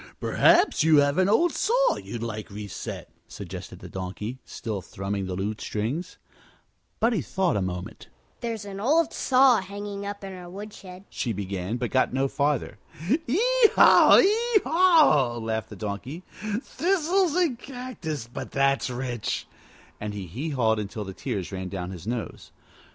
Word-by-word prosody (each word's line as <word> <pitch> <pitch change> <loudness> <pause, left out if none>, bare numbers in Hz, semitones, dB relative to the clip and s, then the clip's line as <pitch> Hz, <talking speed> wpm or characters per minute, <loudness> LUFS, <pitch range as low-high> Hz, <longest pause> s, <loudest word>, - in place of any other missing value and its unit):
"Perhaps 345 - +4
you 160 -1 +5
have 145 +3 +3
an 185 +1 +3
old 330 +11 +4
saw - - +2
you'd 115 -1 -6
like 110 -2 -5
reset," 100 -1 -7 0.2
suggested - - -8
the - - -10
Donkey, 95 +7 -6
still 105 -4 -5
thrumming 95 +1 -4
the 90 - -3
lute 105 +3 -3
strings. 120 +12 -3 0.8
Buddie 225 -5 +2
thought 180 - 0
a 100 - 0
moment. 90 0 -5 0.3
"There's 225 -3 -4
an 195 -1 -7
old 300 +9 +2
saw 255 -4 +4
hanging 200 +1 -6
up 205 0 -6
in 195 -1 -6
our 180 -1 -9
woodshed," 195 -1 -10
she 120 - -2
began, 100 +2 -3
but 120 -1 -3
got 130 -1 +2
no 135 +1 +1
farther. 140 -7 -1 0.3
"Hee 290 - +1 0.4
haw! - - +8
hee 435 +2 +4
haw!" 310 - +4
laughed 110 -1 -3
the - - -9
Donkey. 120 - -5 0.4
"Thistles 355 -1 +1
and 330 -10 +1
cactus, 245 - -6
but 120 - -7
that's 135 -1 +1
rich!" 125 -2 -3 0.5
And 105 -1 -5
he 100 -2 -5
hee 125 - -5
hawed 115 -6 +1
until 105 +1 -5
the 95 - -7
tears 100 -5 -4
ran 95 -1 -5
down 90 -1 -5
his 90 +1 -9
nose. 120 -1 -5
140 Hz, 155 wpm, -26 LUFS, -, 0.8 s, haw